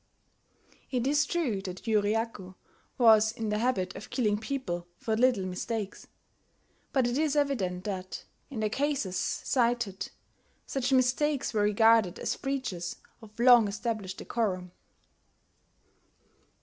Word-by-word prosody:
It 250 -2 -1
is 295 +2 +2
true 265 - -1
that 185 -2 -7
Yuriaku 210 -3 -1 0.4
was 220 -3 +6
in 220 -1 -4
the 210 0 0
habit 215 -7 0
of - - -9
killing 215 -5 +1
people 215 -8 -4
for 220 - -1
little 240 -4 +3
mistakes; 205 +3 -4 0.8
but 265 -3 +2
it 245 +3 0
is 305 -2 +1
evident 210 -12 0
that, 185 -2 -5 0.2
in 245 -6 -5
the 215 - +1
cases 275 -9 -1
cited, 235 +1 0 0.6
such 270 -1 -2
mistakes 265 +2 +2
were 215 - +2
regarded 210 -2 +4
as - - -2
breaches 245 -11 -3 0.3
of 215 0 -15
long 240 -3 +7
established 200 -2 -3
decorum. 185 -6 -2
225 Hz, 125 wpm, -29 LUFS, 195-255 Hz, 0.8 s, long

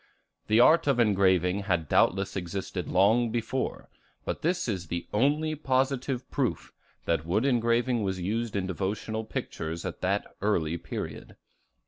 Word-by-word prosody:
The 110 +2 +4
art 155 +6 +6
of 135 -3 +3
engraving 95 -4 +3
had 85 -5 0
doubtless 95 +6 +2
existed 90 0 -4
long 110 +6 +3
before, 120 +3 -3 0.4
but - - -3
this 175 0 0
is 95 -6 -3
the 85 +2 -3
only 150 +8 +2
positive 130 -2 -1
proof - - -2 0.3
that 80 -3 +1
wood 100 +9 0
engraving 120 -1 +2
was 95 -2 -2
used 110 +5 -2
in 100 -2 0
devotional 105 +4 -3
pictures 80 -6 -5
at 90 - -5
that 100 +2 0 0.2
early 85 -5 0
period. - - -6
105 Hz, 140 wpm, -28 LUFS, 95-120 Hz, 0.4 s, art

